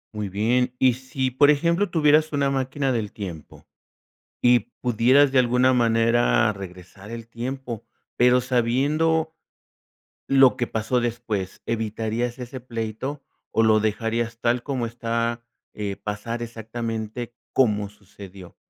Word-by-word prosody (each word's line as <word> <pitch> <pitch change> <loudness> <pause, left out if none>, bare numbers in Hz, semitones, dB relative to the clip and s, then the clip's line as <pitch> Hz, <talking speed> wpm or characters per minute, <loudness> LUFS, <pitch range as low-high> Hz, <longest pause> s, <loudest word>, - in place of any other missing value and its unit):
Muy 105 -2 -3
bien. 125 +6 +1
Y 130 -1 +4
si, 130 +1 -3
por 145 +3 +5
ejemplo, 170 +6 +2
tuvieras 155 -1 +3
una 140 -1 +1
máquina 135 0 -1
del 110 -4 -2
tiempo 90 -7 -9 0.8
y 120 0 +5 0.2
pudieras 125 +4 +4
de 135 - +2
alguna 125 +1 +3
manera 115 -1 +3
regresar 95 +1 -11
el 115 -1 -8
tiempo, 120 -1 -5 0.3
pero 125 +1 +5
sabiendo 145 +7 +1 0.9
lo 135 -2 +5
que 120 - -2
pasó 110 +3 0
después, 115 -5 -3
¿evitarías 115 +2 -2
ese 125 +1 -7
pleito, 120 +4 -5 0.3
o 115 - +2
lo 110 -1 +4
dejarías 115 +2 -1
tal 120 +1 +1
como 130 -3 -2
está, 115 0 -2 0.3
eh, 100 -2 -4
pasar 105 +3 -5
exactamente 115 0 -5 0.2
como 105 -5 +2
sucedió 100 -2 -13
120 Hz, 125 wpm, -24 LUFS, 110-130 Hz, 0.9 s, por